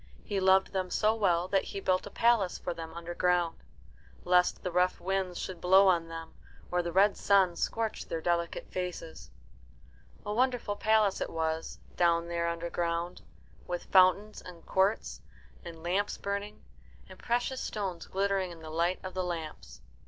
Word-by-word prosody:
He 205 Hz, -3 st, -2 dB
loved 190 Hz, 0 st, +4 dB
them 185 Hz, -1 st, -1 dB
so 215 Hz, +4 st, +2 dB
well 180 Hz, -5 st, +1 dB
that 195 Hz, -1 st, +2 dB
he 200 Hz, -, -5 dB
built 185 Hz, 0 st, 0 dB
a -, -, -7 dB
palace 230 Hz, -5 st, +2 dB
for 175 Hz, -, -4 dB
them 165 Hz, -1 st, -7 dB
underground, 175 Hz, 0 st, 0 dB, 0.6 s
lest 180 Hz, 0 st, +3 dB
the 180 Hz, -, -2 dB
rough 180 Hz, +1 st, +2 dB
winds 190 Hz, -1 st, -2 dB
should 185 Hz, -3 st, -6 dB
blow 190 Hz, +2 st, +6 dB
on 170 Hz, -2 st, +2 dB
them 165 Hz, 0 st, -8 dB, 0.4 s
or 180 Hz, 0 st, +2 dB
the 170 Hz, 0 st, -4 dB
red 195 Hz, +3 st, +4 dB
sun 190 Hz, -3 st, +3 dB
scorch 225 Hz, +3 st, -2 dB
their 165 Hz, -, -3 dB
delicate 170 Hz, 0 st, -1 dB
faces. 180 Hz, -3 st, -5 dB, 1.0 s
A 210 Hz, -, -2 dB
wonderful 245 Hz, -3 st, 0 dB
palace 215 Hz, -2 st, +2 dB
it -, -, -2 dB
was, 160 Hz, 0 st, -2 dB, 0.2 s
down 170 Hz, -1 st, +2 dB
there 170 Hz, 0 st, -1 dB
underground, 170 Hz, +1 st, -2 dB, 0.5 s
with 175 Hz, -1 st, -3 dB
fountains 190 Hz, +3 st, +4 dB
and 175 Hz, -2 st, -12 dB
courts, 195 Hz, +3 st, 0 dB, 0.4 s
and 165 Hz, -2 st, -10 dB
lamps 190 Hz, +4 st, 0 dB
burning, 200 Hz, +1 st, -4 dB, 0.4 s
and -, -, -13 dB
precious 245 Hz, +2 st, -1 dB
stones 195 Hz, -5 st, -4 dB
glittering 195 Hz, -1 st, 0 dB
in 165 Hz, -2 st, -11 dB
the 155 Hz, -, -8 dB
light 170 Hz, +3 st, 0 dB
of 185 Hz, -, -6 dB
the 185 Hz, -, -1 dB
lamps. 155 Hz, -, -6 dB
180 Hz, 160 wpm, -30 LUFS, 170-195 Hz, 1.0 s, blow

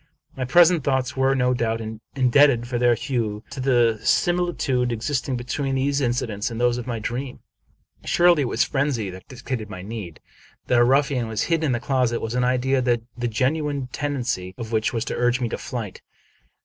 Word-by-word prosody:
My 130 Hz, -, -3 dB
present 170 Hz, +3 st, +5 dB
thoughts 130 Hz, -2 st, 0 dB
were, 135 Hz, 0 st, +2 dB
no 125 Hz, -1 st, +2 dB
doubt, 115 Hz, -2 st, -1 dB, 0.4 s
indebted 130 Hz, -2 st, +4 dB
for 120 Hz, -1 st, -2 dB
their 120 Hz, -1 st, +4 dB
hue 110 Hz, -4 st, -3 dB
to -, -, -7 dB
the 120 Hz, -4 st, +2 dB
simili 175 Hz, +7 st, +1 dB
tude 125 Hz, -2 st, 0 dB
existing 130 Hz, +3 st, -2 dB
between 135 Hz, +3 st, -2 dB
these 140 Hz, +2 st, 0 dB
incidents 120 Hz, -4 st, -1 dB
and 115 Hz, -1 st, -6 dB
those 120 Hz, 0 st, +2 dB
of 120 Hz, -, -7 dB
my 120 Hz, -2 st, -2 dB
dream. 125 Hz, +4 st, -5 dB, 0.6 s
Surely 175 Hz, -3 st, +4 dB
it -, -, +1 dB
was -, -, +1 dB
frenzy 135 Hz, -8 st, -1 dB
that 95 Hz, 0 st, -12 dB
dictated 120 Hz, -3 st, -5 dB
my 90 Hz, -3 st, -8 dB
deed. 100 Hz, -6 st, -7 dB, 0.5 s
That 125 Hz, -, +3 dB
a -, -, +6 dB
ruffian 135 Hz, -1 st, +2 dB
was 110 Hz, -1 st, -1 dB
hidden 165 Hz, -2 st, 0 dB
in 140 Hz, -, +1 dB
the 120 Hz, -, -1 dB
closet 125 Hz, -2 st, 0 dB
was 115 Hz, +1 st, -4 dB
an 125 Hz, 0 st, +1 dB
idea 130 Hz, +1 st, +1 dB
the 120 Hz, -2 st, +1 dB, 0.2 s
genuine 135 Hz, +3 st, -1 dB
tendency 125 Hz, -11 st, -3 dB
of 115 Hz, -2 st, -6 dB
which 110 Hz, -1 st, +1 dB
was 115 Hz, 0 st, -2 dB
to -, -, -3 dB
urge 120 Hz, +1 st, +1 dB
me 120 Hz, -2 st, -1 dB
to -, -, -3 dB
flight. 110 Hz, -6 st, -6 dB
125 Hz, 190 wpm, -23 LUFS, 115-135 Hz, 0.6 s, a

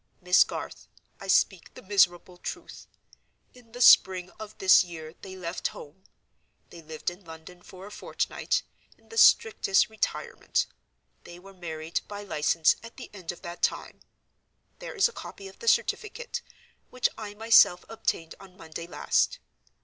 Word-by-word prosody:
Miss 180 Hz, 0 st, +5 dB
Garth, -, -, -8 dB, 0.3 s
I 195 Hz, -, -9 dB
speak 190 Hz, -2 st, +1 dB
the -, -, -12 dB
miserable 185 Hz, -2 st, +2 dB
truth! -, -, -8 dB, 0.7 s
In 245 Hz, -2 st, -19 dB
the 245 Hz, +1 st, -8 dB
spring 185 Hz, -5 st, +6 dB
of 215 Hz, -1 st, -9 dB
this 190 Hz, 0 st, +6 dB
year 160 Hz, -3 st, -9 dB
they 190 Hz, -1 st, -9 dB
left 180 Hz, -1 st, -3 dB
home; 165 Hz, +6 st, -13 dB, 0.7 s
they 170 Hz, -, -11 dB
lived 160 Hz, +2 st, -5 dB
in 180 Hz, +3 st, -15 dB
London 165 Hz, +2 st, -12 dB
for 185 Hz, +1 st, -12 dB
a 205 Hz, -, -11 dB
fortnight, -, -, -2 dB, 0.3 s
in -, -, -28 dB
the 455 Hz, -, -9 dB
strictest 430 Hz, -, +5 dB
retirement; 220 Hz, -, -2 dB, 0.6 s
they 175 Hz, -, -12 dB
were 195 Hz, +2 st, -14 dB
married 165 Hz, -3 st, -4 dB
by 205 Hz, 0 st, -7 dB
license 160 Hz, -3 st, +2 dB
at 230 Hz, 0 st, -13 dB
the 250 Hz, -, -10 dB
end 185 Hz, -5 st, -6 dB
of 175 Hz, -, -14 dB
that 170 Hz, 0 st, -8 dB
time. -, -, -1 dB, 0.8 s
There -, -, -8 dB
is 405 Hz, +1 st, +4 dB
a 470 Hz, -, -11 dB
copy 195 Hz, -, -9 dB
of 190 Hz, -, -15 dB
the 465 Hz, -, -9 dB
certificate, 480 Hz, +2 st, 0 dB, 0.5 s
which 255 Hz, -, +1 dB
I 210 Hz, -2 st, -8 dB
myself 210 Hz, -4 st, +5 dB
obtained 165 Hz, -7 st, -3 dB
on 190 Hz, -2 st, -16 dB
Monday 165 Hz, +1 st, -8 dB
last. -, -, 0 dB
185 Hz, 155 wpm, -27 LUFS, 170-215 Hz, 0.8 s, spring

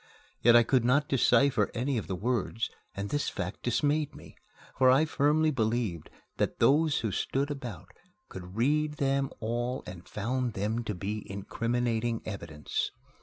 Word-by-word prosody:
Yet 120 Hz, 0 st, +6 dB
I 120 Hz, -, +8 dB
could 125 Hz, +1 st, +2 dB
not 140 Hz, +5 st, +3 dB
decipher 140 Hz, 0 st, +3 dB
any 130 Hz, +3 st, 0 dB
of -, -, -8 dB
the 95 Hz, -, -2 dB
words, 115 Hz, +2 st, -1 dB, 0.2 s
and 100 Hz, +1 st, -4 dB
this 145 Hz, 0 st, 0 dB
fact 95 Hz, 0 st, -5 dB
dismayed 145 Hz, +4 st, 0 dB
me, -, -, -13 dB, 0.4 s
for 130 Hz, -1 st, +5 dB
I 135 Hz, +5 st, +5 dB
firmly 155 Hz, +1 st, +2 dB
believed 110 Hz, -, -1 dB, 0.3 s
that -, -, 0 dB
those 150 Hz, +1 st, +3 dB
who 110 Hz, -, -1 dB
stood 140 Hz, +9 st, -1 dB
about 120 Hz, -, -7 dB, 0.4 s
could 90 Hz, 0 st, -9 dB
read 150 Hz, +5 st, +2 dB
them 140 Hz, -2 st, 0 dB
all 120 Hz, +3 st, -2 dB
and 90 Hz, -1 st, -10 dB
found 120 Hz, +3 st, -2 dB
them 110 Hz, +5 st, -1 dB
to 105 Hz, -, -3 dB
be 105 Hz, +4 st, -4 dB
incriminating 115 Hz, +3 st, -1 dB
evidence. 85 Hz, -8 st, -3 dB
120 Hz, 155 wpm, -29 LUFS, 105-140 Hz, 0.4 s, I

